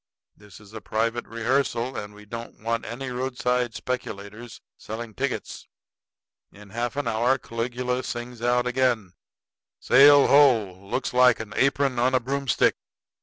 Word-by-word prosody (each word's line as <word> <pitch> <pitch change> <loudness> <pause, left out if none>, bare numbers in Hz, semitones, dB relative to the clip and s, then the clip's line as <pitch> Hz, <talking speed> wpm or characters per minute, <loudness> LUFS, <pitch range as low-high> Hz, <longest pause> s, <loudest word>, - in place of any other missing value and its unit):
This 105 -2 -16
is 105 0 -17
a 110 - -7
private 115 +3 -2
rehearsal, 120 +1 -1
and 105 0 -7
we 105 0 -14
don't 115 +2 -8
want 115 +1 -2
any 125 +3 -6
roadside 125 -1 -1
speculators 110 -2 -6 0.2
selling 110 +1 -7
tickets." 135 +4 -4 0.8
In 100 -1 -15
half 120 +2 -3
an 145 -3 -2
hour 120 +4 +2
Caligula 125 +2 -3
sings 120 -1 -6
out 120 +1 +2
again: 125 -7 0 0.7
"Sail 140 +2 +7
ho! 125 -9 +5
Looks 125 - -2
like 125 -1 +5
an 105 -1 -7
apron 135 -2 +1
on 130 +2 +2
a - - +4
broomstick." 135 -1 0
120 Hz, 140 wpm, -25 LUFS, 110-130 Hz, 0.8 s, Sail